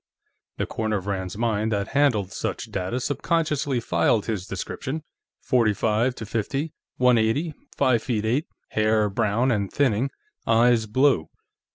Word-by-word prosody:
The - - 0
corner 110 -1 -1
of 95 - -6
Rand's 95 -1 -3
mind 110 -1 0
that 100 -2 -1
handled 130 -9 +2
such - - -4
data 95 +7 -2
subconsciously 145 -1 0
filed 115 -2 +1
his 105 -5 -3
description: 150 +4 -4 0.4
forty 115 -5 +3
five 115 +5 +1
to 110 - -6
fifty, 135 +8 -2 0.2
one 125 -2 +5
eighty, 140 +9 0 0.2
five 130 -5 +3
feet 110 -3 -1
eight, 125 +8 +1 0.2
hair 110 -1 +2
brown 115 +4 +1
and 100 -4 -1
thinning, 130 -2 +1 0.4
eyes 115 0 +4
blue. 130 - +2
115 Hz, 145 wpm, -24 LUFS, 105-130 Hz, 0.4 s, one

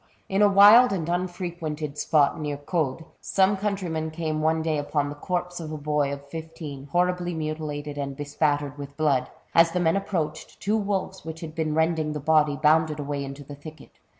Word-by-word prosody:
In 195 +1 +1
a 205 - +6
wild 205 +5 +8
and 175 -5 -2
unfrequented 175 -4 -3
spot 150 0 +2
near 145 -1 -3
Caude, 150 0 -2
some 195 +1 +2
countryman 190 -6 -2
came 155 -1 -3
one 160 +1 +1
day 155 -2 0
upon 145 0 -1
the - - -5
corpse 180 +3 -3
of 160 -2 -6
a 155 - -4
boy 150 -1 0
of 140 0 -7
fifteen, 160 -3 -8
horribly 175 +2 0
mutilated 150 -2 -4
and 140 -1 -3
bespattered 145 -1 -1
with 140 0 -8
blood. 140 -5 +1 0.2
As 165 0 +5
the 180 - +1
men 165 -1 +2
approached, 190 -5 -3
two 210 +2 0
wolves, 200 -3 -2
which 160 0 -7
had 160 -2 -7
been 155 -2 -1
rending 160 -1 +1
the 150 - -3
body, 150 0 +3
bounded 155 0 +3
away 145 -1 -3
into 135 +1 -7
the 145 - -10
thicket. 150 +1 -12
155 Hz, 185 wpm, -25 LUFS, 145-175 Hz, 0.2 s, wild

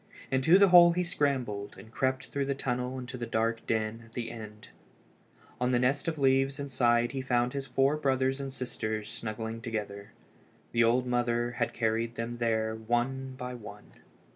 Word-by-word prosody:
Into 135 +7 +5
the 200 -1 +6
hole 175 -1 +8
he 180 +1 0
scrambled, 130 -11 -1
and 110 - -13
crept 130 +1 -1
through 140 -1 -2
the 140 - 0
tunnel 125 -1 -3
to 125 +1 -7
the 120 -1 -4
dark 115 +1 0
den 110 0 -1
at 115 0 -19
the 120 -1 -4
end. 105 -2 -10 0.9
On 125 0 +1
the 125 - +3
nest 130 +5 +1
of 160 -1 -1
leaves 135 0 +2
inside 120 -4 +2
he 135 - -3
found 125 -1 +1
his 135 -1 -4
four 135 +4 +2
brothers 135 -2 +1
and 135 -1 -5
sisters 110 -4 -4
snuggling 110 +1 -5
together. 105 -3 -5 0.6
The 115 0 +3
old 120 +2 +3
mother 120 -1 0
had 120 -1 -1
carried 115 +1 -1
them 115 +1 -4
there 110 -2 0
one 120 +4 -2
by 125 0 -5
one. 120 -4 -11
125 Hz, 175 wpm, -29 LUFS, 115-135 Hz, 0.9 s, hole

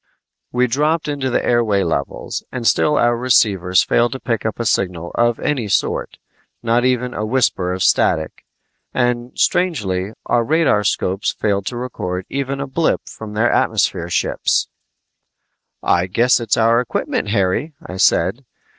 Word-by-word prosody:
We 125 0 +2
dropped 150 +6 0
down 150 - -2
into 135 -2 -2
the 120 - 0
airway 110 -5 +2
levels, 75 -4 -3
and 125 -2 -5
still 150 +5 +3
our 120 0 +3
receivers 100 -7 +3
failed 120 0 +1
to 130 - -6
pick 115 -4 -2
up 110 - -5
a 115 - -2
signal 90 -5 -1
of 120 0 +1
any 130 -7 -1
sort - - -1 0.5
not 120 +1 +2
even 125 -1 0
a 105 - -3
whisper 110 -6 0
of 90 0 -2
static. 80 -2 +1 0.5
And 120 0 -1
strangely, 105 - 0
our 120 - +2
radarscopes 105 - +1
failed 100 -2 -1
to 120 - -3
record 90 -7 -4
even 135 0 -3
a 140 - -2
blip 155 +5 0
from 110 -1 -9
their 115 +3 +2
atmosphere - - +1
ships! - - 0 1.1
"I 90 +1 +2
guess 120 +8 +3
it's 115 -3 0
our 115 +1 +4
equipment, 120 - -2
Harry," 105 - 0
I 90 - -7
said. - - +2
115 Hz, 155 wpm, -19 LUFS, 100-130 Hz, 1.1 s, our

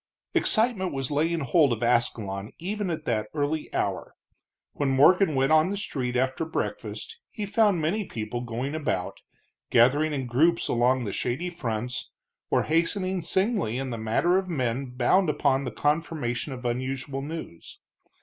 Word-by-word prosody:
Excitement 220 -5 +2
was 135 0 -3
laying 160 +3 +1
hold 140 +1 +3
of 120 0 -1
Ascalon 110 -4 0
even 200 +3 -3
at 155 -2 -4
that 110 -3 0
early 150 +1 -1
hour. - - -2 0.6
When 145 -2 -1
Morgan 155 +5 +5
went 135 +2 +2
on 155 +2 +5
the 200 - -2
street 130 -10 -3
after 130 +4 0
breakfast 440 - -4
he 210 - -5
found 205 -3 +3
many 195 +7 0
people 115 -1 -4
going 125 +4 -4
about, 145 -13 -2 0.5
gathering 140 +7 +4
in 135 -3 -2
groups 155 +8 +2
along 125 +2 +2
the 100 -4 -4
shady 140 +9 -2
fronts, 125 -6 -4 0.4
or - - +2
hastening 185 +3 0
singly 190 - 0
in 135 -1 -3
the 115 - -3
manner 145 +12 +2
of 190 -1 -6
men 130 -4 -1
bound 125 +9 +2
upon 140 -2 +1
the - - -3
confirmation 145 -4 -1
of 125 -1 -7
unusual 130 +3 -2
news. 145 - -8
140 Hz, 155 wpm, -26 LUFS, 125-170 Hz, 0.6 s, Morgan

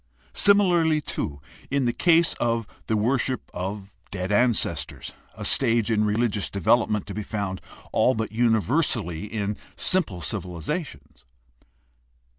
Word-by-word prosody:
Similarly, 175 -6 +4
too, 70 - -4 0.3
in 140 -1 +1
the 120 - +1
case 170 +2 +3
of 115 -1 0 0.2
the 110 - +1
worship 125 +3 0
of 100 +2 -5 0.2
dead 95 0 -4
ancestors, 105 - 0 0.2
a - - -6
stage 115 -3 +2
in 105 -1 +2
religious 105 -1 0
development 105 +1 +1
to 100 - -7
be 105 - -4
found 100 -3 -4 0.3
all 130 - +3
but 110 0 -3
universally 110 - +1
in 105 -1 -3 0.2
simple 180 - +2
civilizations. 85 - -5
110 Hz, 120 wpm, -25 LUFS, 100-125 Hz, 0.3 s, Similarly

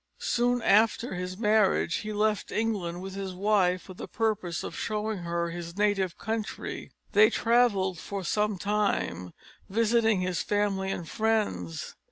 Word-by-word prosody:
Soon 245 0 +1
after 225 +3 +3
his 180 0 -4
marriage 210 -5 +2
he 215 - -5
left 210 0 0
England 190 -6 -2
with 190 0 -6
his 195 -1 -5
wife 185 -2 +2
for 185 - -10
the - - -8
purpose 205 -7 -1
of - - -6
showing 215 -1 -2
her 170 0 -2
his 170 +1 -7
native 200 -4 +1
country. 220 0 -4 0.2
They 215 +2 +6
travelled 210 -7 +2
for 200 +2 -5
some 210 +3 0
time, 200 - -1 0.4
visiting 225 -1 +2
his 180 -2 -1
family 205 -2 0
and 175 -3 -4
friends. 205 - -1
200 Hz, 145 wpm, -28 LUFS, 180-215 Hz, 0.4 s, They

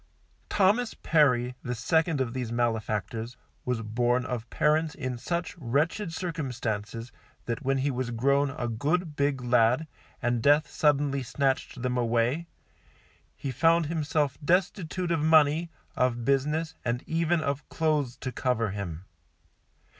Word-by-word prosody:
Thomas 210 +4 +2
Perry, 125 -6 +2
the 125 0 -3
second 160 +5 +1
of 120 -3 -2
these 125 -3 -3
malefactors, 115 0 -2 0.3
was 125 -3 -1
born 120 +3 +1
of 120 -3 -4
parents 155 +1 +1
in 130 -2 -4
such 170 +6 -3
wretched 155 - 0
circumstances 125 - -4 0.3
that 120 +2 -3
when 135 0 +1
he 140 +2 0
was 125 -1 -2
grown 140 +4 +2
a 125 -3 -4
good 150 +8 -1
big 140 -3 0
lad, 125 +4 +3 0.3
and 120 -2 0
death 145 +4 +4
suddenly 145 -2 +1
snatched 130 0 -1
them 125 -1 0
away, 120 +7 +1 0.9
he 135 - -4
found 165 +5 +3
himself 150 -2 -1
destitute 180 +1 0
of 165 - +2
money, 155 +1 +4 0.3
of 120 -2 0
business 150 +5 +1
and 120 +1 -1
even 165 +1 +1
of 140 -2 -3
clothes 150 -6 0
to 130 - -4
cover 120 -5 0
him. 95 -4 -5
135 Hz, 135 wpm, -28 LUFS, 120-155 Hz, 0.9 s, death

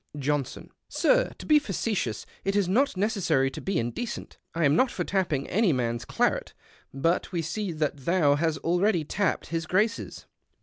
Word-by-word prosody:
Johnson. 145 -2 -2
— - - -56
" - - -55
Sir, - - +2
to - - -9
be 305 -1 +6
facetious, 195 - -2 0.2
it 195 +1 -1
is 200 -3 +2
not 255 +4 +2
necessary 190 - +1
to - - -7
be 195 -2 -1
indecent. 120 - -4 0.2
I 165 -1 +2
am 145 +1 +4
not 255 +9 +4
for 180 - -3
tapj)ing 170 -8 0
any 210 -1 +2
mans 120 -3 -1
claret, - - 0 0.4
but 165 +9 0
we 170 -3 -1
see 200 +4 -3
that 155 -2 -1
thou 150 +1 +2
hast 155 +1 0
already 175 +1 +2
tapped 190 +3 -1
his 165 -1 -2
Grace's." 210 +5 -1
170 Hz, 180 wpm, -27 LUFS, 145-205 Hz, 0.4 s, be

